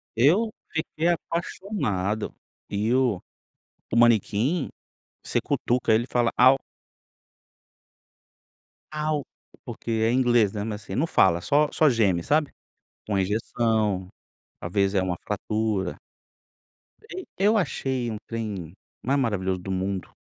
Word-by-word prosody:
Eu 185 - +3 0.2
fiquei 160 0 -1
apaixonado, 165 - -2 0.3
e 105 +4 0
o 125 -8 +2 0.7
o - - +1
manequim, 120 - +3 0.5
você - - 0
cutuca 120 -2 +1
ele 115 +2 +2
e - - -10
fala: 120 -1 +1
"Au". 130 +2 +7 2.5
Au, 150 -3 0 0.4
porque - - -8
é 110 0 +2
inglês, 120 -5 +3
né, 100 - -3
mas 105 -1 -5
assim, - - -6
não 155 +6 +1
fala, 85 - +3
só 150 +7 +3
só 155 - +4
geme, 100 -9 +2
sabe, 150 0 +1 0.6
com 105 - -2
a 95 - +2
injeção, 105 -1 0 0.5
talvez 100 +3 0
é 95 - +2
uma 90 -2 -2
fratura. 105 -2 -2 1.1
Ei 370 0 -6
eu 210 +3 +4
achei 130 - -1
um 110 - -4
trem 105 -8 -5 0.3
mais 140 +3 +1
maravilhoso 95 -7 0
do 95 +2 -6
mundo, 95 0 -2
115 Hz, 125 wpm, -25 LUFS, 100-135 Hz, 2.5 s, Au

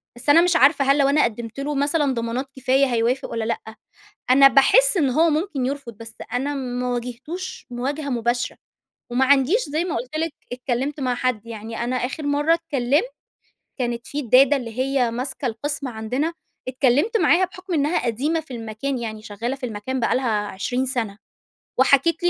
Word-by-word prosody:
بس 240 +4 -5
أنا 310 +4 +8
مش 350 0 +2
عارفة 275 -2 +5
هل 275 +1 +4
لو 280 -1 +3
أنا 295 +2 +4
قدّمت 230 +1 -3
له 290 +1 -2
مثلًا 285 0 +1
ضمانات 235 +3 -3
كفاية 265 +1 +2
هيوافق 245 +2 0
والّا 230 -1 -3
لأ؟ 220 -1 -4 0.6
أنا 275 +2 +8
باحس 420 - +5
إن 290 -7 +2
هو 320 +6 +3
ممكن 305 -4 -1
يرفض، 275 -3 -4
بس 225 +1 -11 0.2
أنا 270 +4 -1
ما 250 -2 -3
واجهتوش 250 +10 -5
مواجهة 280 +5 -3
مباشرة. 240 -1 -1 0.5
وما 250 +2 +2
عنديش 280 - +3
زي 310 +4 -1
ما 360 - -2
قُلت 255 +6 -5
لِك 325 0 -1 0.2
اتكلّمت 255 +4 -2
مع 255 -2 0
حد. 245 -3 -2
يعني 225 +1 -5
أنا 250 +1 -1
آخر 255 +5 -3
مرّة 290 +3 +3
اتكلّمت، 300 - 0 0.7
كانت 240 -2 -3
في 290 - -3
الدادة 270 +2 +5
اللي 235 -3 -6
هي 260 -2 +1
ماسكة 260 +3 -4
القسم 275 +5 -3
عندنا، 250 +8 -2 0.4
اتكلّمت 270 - +2
معاها 345 -1 +4
بحُكم 365 0 -8
إنّها 295 -3 +1
قديمة 285 +8 0
في 315 - -20
المكان 230 +4 -4
يعني 220 -2 -6
شغالة 220 +5 -4
في 265 - -5
المكان 240 +4 -4
بقى 230 - +1
لها 255 -1 -1 0.2
20 245 +7 -2
سَنة. 225 -6 -2 0.6
وحكيت 280 +6 +3
لي 350 - +4
265 Hz, 180 wpm, -22 LUFS, 240-290 Hz, 0.7 s, أنا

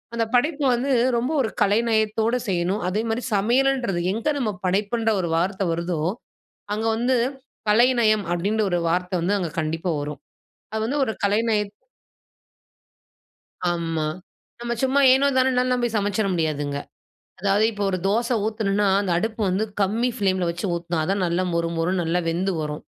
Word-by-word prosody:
அந்த 230 -1 +1
படைப்பு 295 +4 +1
வந்து 265 +4 -1 0.3
ரொம்ப 250 +5 -1
ஒரு 225 - 0
கலைநயத்தோடு 220 +2 +2
செய்யணும், 180 +2 0
அதே 200 +4 0
மாரி 225 +3 -1
சமையலன்றது 240 -1 +1
எங்க 225 +7 -1
நம்ம 230 -5 0
படைப்புன்ற 210 +5 0
ஒரு 170 - -2
வார்த்த 190 +3 0
வருதோ, 170 -1 -2 0.7
அங்க 215 +2 -2
வந்து 250 +2 +2 0.5
கலைநயம் 225 -2 +4
அப்டின்ற 200 +6 0
ஒரு 175 - +2
வார்த்தை 180 +2 -1
வந்து 190 +5 +1
அங்க 175 -3 -2
கண்டிப்பா 165 +3 -2
வரும். 145 0 -5 0.6
அது 220 - -1
வந்து 280 +5 -1
ஒரு 220 - -2
கலைநய 215 +2 +2 2.1
ஆமா. 165 -2 -2 0.5
நம்ம 235 0 -2
சும்மா 265 +2 +3
ஏனோ 275 +2 +3
தானோன்னால 250 -1 +2
சமைச்சுற 205 0 0
முடியாதுங்க. 150 -4 -1 0.6
அதாவது 200 +2 +2
இப்போ 205 -2 -4
ஒரு 185 - 0
தோசை 235 +5 +1
ஊத்துனோம்ன்னா 210 -2 0
அந்த 200 -3 -1
அடுப்பு 220 +4 -2
வந்து 190 +4 0 0.2
கம்மி 220 +6 +1
பிளேம்ல 190 -4 +1
வச்சு 170 +3 -3
ஊத்தணாதான் 170 +3 -1
நல்ல 175 +1 0
மொறு 170 0 0
மொறு 165 +2 0
நல்லா 170 +1 0
வெந்து 180 +4 0
வரும். 150 -1 -4
205 Hz, 145 wpm, -23 LUFS, 175-235 Hz, 2.1 s, கலைநயம்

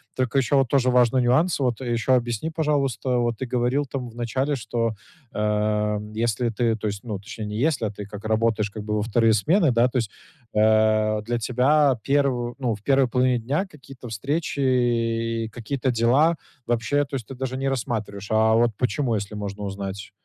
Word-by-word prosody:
Только 130 +1 0
ещё 135 +2 +3
вот 135 -2 +3
тоже 130 -1 +2
важный 125 0 +4
нюанс. 140 +9 +2
Вот 125 -4 0
а 130 - -6
ещё 120 +1 +2
объясни, 120 +4 -1
пожалуйста, 140 -6 0
вот 120 -2 0
ты 130 - -3
говорил 125 +3 0
там 130 -2 -5
в 115 - -16
начале, 130 +5 -1
что, 115 -1 -1 0.4
ам, 105 0 0
если 115 +1 0
ты, 115 0 0
то 110 -1 -4
есть, 100 0 -4
ну, 105 -4 -3
точнее, 105 +3 -7
не 105 0 -5
если, 140 -4 +1
а 105 - -2
ты 105 -1 -8
как 105 +1 -10
работаешь, 110 -1 +1
как 105 +1 -7
бы 105 0 -2
во 105 - 0
вторые 115 +1 +2
смены, 160 - +3
да? 120 +1 +4
То 125 0 -1
есть. 110 -4 -3 0.4
Э, 110 0 +3
для 120 +2 -2
тебя 130 +4 +3
первы 135 -4 +1
ну, 120 -4 0
в 105 - -16
первой 135 0 +3
половине 125 0 +2
дня 140 - -1
какие-то 135 -7 -12
встречи 140 - -2
и 115 -3 +1
какие-то 125 +3 -2
дела 125 +8 +3 0.3
вообще, 120 +5 +1
то 140 - -6
есть 125 -5 -4
ты 135 - -8
даже 130 0 -4
не 135 +1 -1
рассматриваешь. 110 -6 -3
А 110 0 +4
вот 120 +1 +3
почему, 125 0 0
если 105 0 -4
можно 105 0 -5
узнать? 100 0 -5
120 Hz, 195 wpm, -24 LUFS, 110-130 Hz, 0.4 s, важный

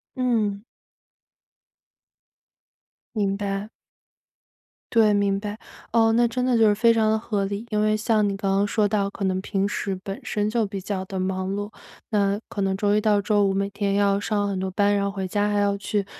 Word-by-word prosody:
嗯。 220 -5 0 2.5
明 200 -2 0
白。 200 +1 -3 1.2
对， 220 -2 +5
明 200 -1 +1
白。 210 +1 -5 0.4
哦， 225 -1 +4
那 235 +1 +3
真 250 +2 -2
的 250 -2 +2
就 220 -1 +5
是 205 - +3
非 230 +2 +4
常 220 -1 +2
的 220 - +2
合 210 -3 -2
理。 200 +3 -4
因 210 -1 0
为 215 0 +2
像 215 -1 +1
你 200 - -1
刚 195 -1 -1
刚 200 +1 +2
说 210 0 +1
到 200 -2 0
可 200 - -7
能 185 -1 0
平 195 0 -1
时 200 -1 -2
本 195 +5 -5
身 210 -4 -1
就 225 -1 +1
比 195 -1 -5
较 190 -1 -3
地 190 0 -6
忙 185 0 -2
碌， 205 +1 -4 0.4
那 200 -2 +1
可 205 - -7
能 195 0 +1
周 205 +1 +1
一 210 - +3
到 210 -1 +2
周 205 0 +2
五 195 - +1
每 195 +1 -1
天 200 0 -1
要 200 0 +2
上 205 -1 -1
很 190 -1 -2
多 190 - -2
班， 205 +2 +2
然 200 0 +1
后 - - 0
回 195 -1 -4
家 205 +2 0
还 205 0 +1
要 200 0 +1
去 200 0 -2
205 Hz, 220 characters per minute, -24 LUFS, 195-215 Hz, 2.5 s, 对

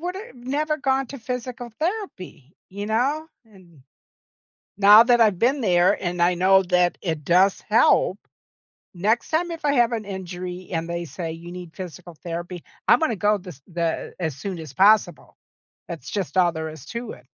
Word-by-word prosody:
would 360 +2 -4
have 440 - -9
never 290 +5 -2
gone 270 -1 0
to 275 - -8
physical 245 0 -5
therapy, 315 - -5 0.2
you 200 +2 -6
know? 270 +8 0 0.2
And, 175 -9 -20 1.0
now 205 +2 +9
that 240 -1 +4
I've 210 -5 +4
been 265 +6 +2
there 180 -2 +3
and 175 -1 -1
I 175 +1 +4
know 190 +2 +4
that 180 -1 +3
it 160 -5 -3
does 185 +3 +4
help, 210 -3 +3 0.8
next 210 +7 0
time 340 +2 0
if 330 -2 -7
I 285 - +3
have 240 -2 +3
an 225 - -2
injury 180 -1 -7
and 165 +1 -2
they 170 0 -3
say 165 0 -6
you 170 +2 -9
need 180 -2 -9
physical 180 -2 -9
therapy, 175 +1 -6 0.2
I'm - - +6
gonna 285 -8 0
go 210 +2 +2
this 180 -8 -12
the 170 -2 -3
as 160 -6 -2
soon 185 +2 -5
as 155 -4 -9
possible. 195 -3 +3 0.5
That's 165 -7 -7
just 195 -3 -3
all 175 -1 +4
there 160 -1 -4
is 155 -3 -11
to 235 +6 -6
it. - - -16
190 Hz, 180 wpm, -23 LUFS, 175-240 Hz, 1.0 s, now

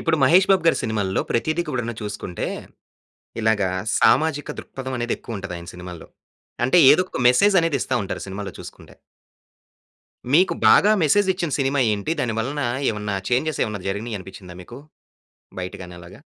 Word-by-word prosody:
ఇప్పుడు, 165 -1 +1
'మహేష్ 180 +9 +5
బాబు' 190 -3 +3
గారి 165 - +4
సినిమాల్లో 105 -5 -1
ప్రతీది 155 +8 0
కూడాను 120 -2 -3
చూసుకుంటే, 105 -4 -5 0.9
ఇలాగా 105 -4 +1 0.3
సామాజిక 155 -2 +3
దృక్పథమనేది 130 -3 -4
ఎక్కువుంటది 95 -6 -7
ఆయన 85 0 -10
సినిమాల్లో. 90 -1 -10 0.6
అంటే, 130 - +3
ఏదోక 180 -4 0
మెసేజనేది 165 0 +3
ఇస్తా 130 - -1
ఉంటారు - - -5
సినిమాల్లో 95 0 -6
చూసుకుంటే. - - -12 1.4
మీకు 185 +4 +4
బాగా 210 - +6
మెసేజ్ 190 +6 +3
ఇచ్చిన 170 -4 -3
సినిమా 135 0 +1
ఏంటి? 105 +10 -2
దాని 120 -4 -1
వలన 135 +6 -2 0.3
ఏమన్నా 105 -1 -4 0.2
చేంజెస్ 150 +6 0
ఏమన్నా 105 -4 -5
జరిగినాయనిపిచ్చిందా 95 -3 -6
మీకూ? 120 +7 -11 0.8
బయటగాని 90 -1 -8
అలాగా? 85 - -14
120 Hz, 130 wpm, -22 LUFS, 100-155 Hz, 1.4 s, బాగా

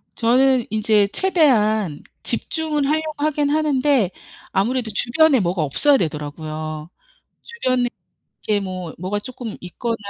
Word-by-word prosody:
저는 250 +1 +3
이제 215 -1 +3
최대한 220 - +2 0.2
집중을 310 -3 -1
하려고 310 +1 -1
하긴 295 -1 +1
하는데 285 - +2 0.4
아무래도 230 +3 0
주변에 265 +6 +3
뭐가 175 -2 0
없어야 275 - +3
되더라고요. 155 - -4 0.5
주변에 255 - -1 0.6
이렇게 210 -1 +2
뭐 185 -4 -6
뭐가 185 +4 -2
조금 240 0 -7
있거나 230 +6 -4
230 Hz, 290 characters per minute, -21 LUFS, 185-285 Hz, 0.6 s, 저는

